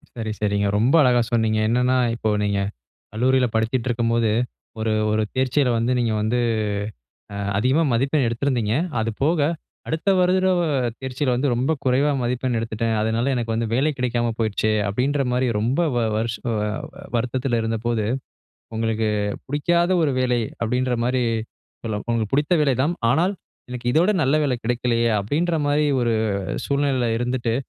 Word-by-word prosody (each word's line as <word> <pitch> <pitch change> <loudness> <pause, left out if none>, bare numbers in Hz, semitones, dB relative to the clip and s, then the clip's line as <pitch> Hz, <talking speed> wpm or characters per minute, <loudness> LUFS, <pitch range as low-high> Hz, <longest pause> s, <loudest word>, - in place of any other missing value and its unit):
சரி, 110 -2 -4
சரிங்க. 100 -1 +1
ரொம்ப 120 +8 +3
அழகா 125 -2 +4
சொன்னீங்க. 110 -2 +2
என்னன்னா, 125 +2 +2 0.2
"இப்போ 110 -1 -2
நீங்க 100 -1 0 0.5
கல்லூரியில 125 +3 +2
படிச்சுட்ருக்கும்போது 115 0 +1 0.5
ஒரு 110 0 0 0.2
ஒரு 110 - +1
தேர்ச்சியில 130 +1 +1
வந்து 115 +2 +1
நீங்க 115 -2 +1
வந்து 110 +3 0 1.0
அ - - -5 0.2
அதிகமா 130 +9 +2
மதிப்பெண் 135 +4 +1
எடுத்திருந்தீங்க. 115 -2 0 0.3
அது 115 +1 -1
போக, 160 +4 +2 0.5
அடுத்த 160 +5 0
வருட 185 0 +3 0.4
தேர்ச்சியில 130 0 -1
வந்து 130 +4 0
ரொம்ப 130 +6 +1
குறைவா 135 +3 +3
மதிப்பெண் 125 0 -1
எடுத்துட்டேன். 115 0 -2
அதனால 115 +4 0
எனக்கு 115 -2 -2
வந்து 115 0 -1
வேலை 140 +5 +2
கிடைக்காம 120 -2 0
போயிருச்சு." 110 -1 0 0.2
அப்படீன்ற 135 +7 0
மாரி 125 +1 +1
ரொம்ப 120 +7 0 0.2
வ - - +3 0.2
வருஷ 115 +1 -1 0.2
அ - - 0 0.6
வருத்தத்துல 120 0 -1
இருந்தபோது, 115 0 -1 0.7
"உங்களுக்கு 110 -1 0 0.4
புடிக்காத 170 +5 +1
ஒரு 145 -4 +2
வேலை." 125 -1 +1 0.2
அப்படீன்ற 125 +2 0
மாரி 125 +1 +1 0.6
சொல்ல 110 -2 -2
"உங்களுக்கு 115 -3 -1
பிடித்த 145 +5 +2
வேலை 140 -3 +2
தான். 160 +5 +1 0.2
ஆனால் 175 +9 +2 0.4
எனக்கு 125 -1 -6
இதோட 170 +8 +4
நல்ல 135 +1 +2
வேலை 130 -3 0
கிடைக்கலையே." 120 0 +1
அப்படீன்ற 160 - 0
மாரி 150 +1 +2
ஒரு 120 -1 +1 0.5
சூழ்நிலையில 140 -3 +1
இருந்துட்டு, 120 -1 -1
125 Hz, 145 wpm, -22 LUFS, 115-135 Hz, 1.0 s, அழகா